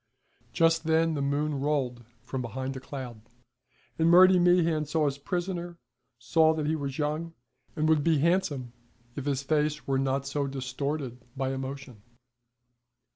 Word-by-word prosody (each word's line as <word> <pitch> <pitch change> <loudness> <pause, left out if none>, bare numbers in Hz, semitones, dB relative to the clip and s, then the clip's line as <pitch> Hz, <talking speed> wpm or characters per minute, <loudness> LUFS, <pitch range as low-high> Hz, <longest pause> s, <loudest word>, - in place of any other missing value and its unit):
Just 165 +3 +2
then 160 0 +2
the 145 - -2
moon 145 +1 -1
rolled 135 -5 -1 0.2
from 130 +1 -4
behind 130 +3 -4
a - - -5
cloud, 130 -4 -8 0.8
and 165 +1 +4
Murty 185 +1 +7
Meehan 175 -3 +3
saw 155 +1 0
his 140 -1 -1
prisoner, 175 +1 -3 0.4
saw 160 +7 +3
that 155 -1 -2
he 155 +2 +1
was 140 -3 -4
young, 155 +2 -2 0.4
and 155 -1 0
would 155 -2 +3
be 165 -1 +3
handsome 145 -6 0 0.4
if 140 - -5
his 140 -1 -1
face 150 0 0
were 135 -1 0
not 135 0 0
so 140 0 -2
distorted 135 -1 -4
by 135 0 -1
emotion. 135 -4 -7
145 Hz, 150 wpm, -28 LUFS, 135-160 Hz, 0.8 s, Murty